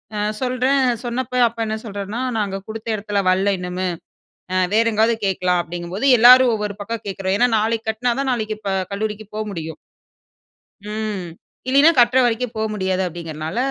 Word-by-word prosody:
அ - - -2 0.2
சொல்றேன், 255 +2 +1 0.2
சொன்னப்போ 250 +1 -3
அப்பா 230 0 -7
என்ன 220 0 -2
சொல்றாருனா, 205 +3 -5 0.2
"நாங்க 195 -2 -2
கொடுத்த 220 +1 -8
இடத்துல 205 -1 -2
வரல 190 +2 +2
இன்னுமே, 180 +1 -3 0.6
அ - - -1 0.2
வேற 225 +1 +4
எங்காவது 225 +2 +3
கேக்கலாம்" 180 -2 +1
அப்டிங்கும்போது 175 +8 -3
எல்லாரும் 250 +1 +8
ஒவ்வொரு 210 -1 -4
பக்கம் 230 +1 -5
கேக்குறோம். 190 0 -2
ஏன்னா 245 +1 +4
நாளைக்கு 225 +1 -1
கட்டுனா 235 +2 -1
தான் 270 -1 0
நாளைக்கு 215 -2 -2
இப்ப 200 -2 -3 0.2
கல்லூரிக்கு 215 0 -4
போக 215 - -2
முடியும் 160 -2 -6 1.1
ம், 210 -3 -4 0.4
இல்லின்னா 280 +5 +6
கட்ற 240 +2 +5
வரைக்கும் 240 0 -1
போக 220 0 -1
முடியாது, 190 -2 -1
அப்டிங்குறனால 160 +2 -6
215 Hz, 160 wpm, -20 LUFS, 190-235 Hz, 1.1 s, எல்லாரும்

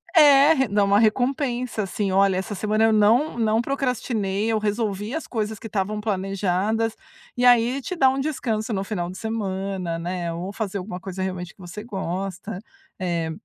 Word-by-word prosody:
É, 290 -2 +7
dá 205 0 +2
uma 200 +1 +4
recompensa 245 0 +1
assim. 195 +1 -2
"Olha, 195 0 +4
essa 190 +3 -3
semana 215 +2 +1
eu 225 0 +4
não 225 +8 +3
não 220 0 +2
procrastinei. 225 -6 -1
Eu 220 - +1
resolvi 210 0 -2
as 320 - -3
coisas 220 -2 -2
que 225 - -8
estavam 210 0 -2
planejadas" 200 +2 0 0.4
e 250 - +2
aí 245 +2 +5
te 365 - -4
dá 270 -6 +5
um 265 +1 -1
descanso 235 -6 -2
no 195 -1 -1
final 180 -3 -3
de 185 - -8
semana, 195 -5 -3
né. 175 0 -3
Ou 175 +3 -5
fazer 205 -1 -3
alguma 180 -1 -6
coisa 190 0 -6
realmente 180 -2 -4
que - - -36
você 180 +4 -8
gosta, 190 -1 -4 0.4
eh, 170 -3 -1
210 Hz, 175 wpm, -24 LUFS, 190-230 Hz, 0.4 s, É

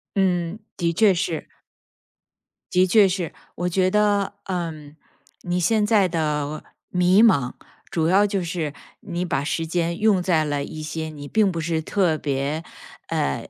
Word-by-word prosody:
嗯， 180 -1 0 0.2
的 170 -1 0
确 215 +1 +5
是。 170 -3 -2 1.2
的 185 +1 +4
确 200 +2 +5
是。 180 -3 -3 0.2
我 175 0 -1
觉 185 +1 +2
得， 205 -1 +2
嗯， 160 -5 -5 0.5
你 175 0 -1
现 210 +4 +2
在 210 -3 +4
的 150 -3 -2 0.3
迷 180 +3 +4
茫， 140 - +3 0.4
主 160 -1 0
要 195 +4 +5
就 195 -3 -1
是 165 -4 -3 0.3
你 175 -2 -3
把 140 -5 -1
时 165 +2 -1
间 170 +1 -1
用 210 -4 +3
在 170 -3 +2
了 145 -1 -1
一 155 +1 -7
些 160 +1 -4
你 145 -2 -9
并 210 +3 +2
不 170 - -4
是 160 0 -1
特 175 -2 +1
别 145 +2 -2 0.4
呃 70 - -2
175 Hz, 165 characters per minute, -23 LUFS, 155-190 Hz, 1.2 s, 确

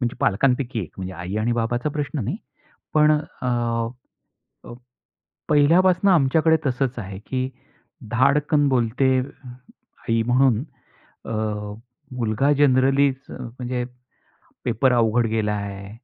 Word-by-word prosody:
म्हणजे 120 -2 -2
पालकांपैकी 125 +3 +1
एक 90 - -7
म्हणजे 95 0 -5
आई 90 +3 -5
आणि 115 +2 0
बाबाचा 120 +4 -1
प्रश्न 145 -2 -3
नाही. - - -2 0.6
पण 150 0 +5 0.3
अ, 125 - -2 1.2
अ, - - -10 0.8
पहिल्यापासून 175 +6 +4
आमच्याकडे 160 0 +4
तसंच 130 -1 -1
आहे 95 -3 -6
की 130 0 -2 0.6
धाडकन 145 +4 +3
बोलते 130 +1 +2
आई 125 -3 -5
म्हणून 125 -1 +3 0.6
अ, - - -4 0.8
मुलगा 125 +4 +1
जनरली 135 0 +4 0.2
म्हणजे 125 +1 -5 0.8
पेपर 130 +3 +2
अवघड 120 0 +2
गेला 110 -1 0
आहे 100 -1 -5
125 Hz, 110 wpm, -23 LUFS, 115-140 Hz, 1.2 s, पण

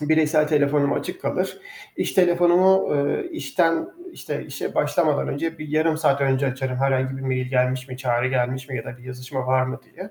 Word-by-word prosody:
Bireysel 155 0 +3
telefonum 145 -1 +2
açık - - -4
kalır. - - -2 0.4
İş - - -1
telefonumu, 180 0 +4
eee, 145 - 0
işten, 180 - 0 0.2
işte, - - -5
işe - - -5
başlamadan - - +1
önce 165 0 -3
bir 155 -1 -7
yarım 155 +1 +1
saat 140 -3 +2
önce 135 0 +2
açarım. 130 0 -2
Herhangi 135 0 0
bir 135 - -7
mail 130 -1 -1
gelmiş 130 0 0
mi, 130 - -7
çağrı 125 -1 0
gelmiş 130 +1 -1
mi 130 - -4
ya 115 - -5
da 120 - -9
bir 125 - -16
yazışma 130 +1 -6
var 130 0 +3
mı 130 +1 -4
diye. 190 +10 -11
135 Hz, 190 wpm, -23 LUFS, 130-160 Hz, 0.4 s, telefonumu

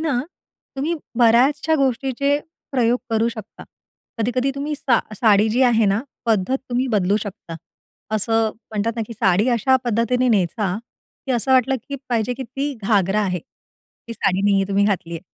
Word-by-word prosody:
ना, 300 -6 0 0.6
तुम्ही 300 +5 -1 0.2
बऱ्याचशा 270 +7 +4
गोष्टीचे 270 +2 +1 0.3
प्रयोग 245 -1 +2
करू 225 +1 +2
शकता. 220 -2 -9 0.5
कधी-कधी 250 +4 0
तुम्ही 290 +2 -3
सा 250 -4 +2 0.2
साडी 215 -1 +4
जी 250 +4 +2
आहे 230 -3 +4
ना, 195 +2 +2 0.3
पद्धत 225 +3 +2
तुम्ही 250 +2 0
बदलू 200 -1 +2
शकता. 195 -5 -8 0.6
असं 225 +1 +1 0.2
म्हणतात 220 +1 -1
ना, 225 - -1
की 230 - -8
साडी 210 0 +2
अशा 245 +2 +3
पद्धतीने 240 +2 +1
नेसा, 195 -2 +1 0.5
की 265 - 0
असं 245 +2 +1
वाटलं 260 +1 +3
की 280 - -4
पाहिजे 240 0 0
की 265 - -6
ती 275 +4 -4
घागरा 200 -1 +2
आहे. 180 -2 -1
ती 230 +7 -16
साडी 195 -3 0
नाहीये 200 -1 +3
तुम्ही 200 +1 +2
घातली 185 -5 -1
आहे 165 - -5
230 Hz, 160 wpm, -21 LUFS, 205-255 Hz, 0.6 s, बऱ्याचशा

